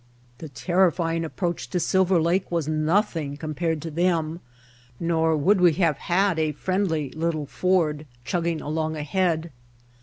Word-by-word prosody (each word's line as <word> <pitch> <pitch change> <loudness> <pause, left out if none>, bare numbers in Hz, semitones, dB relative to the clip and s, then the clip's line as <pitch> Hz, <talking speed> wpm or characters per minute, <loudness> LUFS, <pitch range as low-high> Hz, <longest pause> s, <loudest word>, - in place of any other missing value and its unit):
The 160 - -8
terrifying 165 +3 +1
approach 165 -5 -3
to 180 - -1
Silver 185 +1 +2
Lake 175 +4 +1
was 165 -4 -1
nothing 155 -2 0
compared 155 0 -2
to 165 - -5
them, 165 -1 0 0.6
nor 160 -1 +1
would 185 +6 +3
we 175 -2 +6
have 165 -5 +1
had 185 -1 +1
a 155 -1 0
friendly 165 -4 -1
little 160 -2 -2
Ford 155 -2 0 0.2
chugging 170 +3 -1
along 155 +1 -2
ahead. 160 +1 -1
165 Hz, 140 wpm, -24 LUFS, 155-175 Hz, 0.6 s, we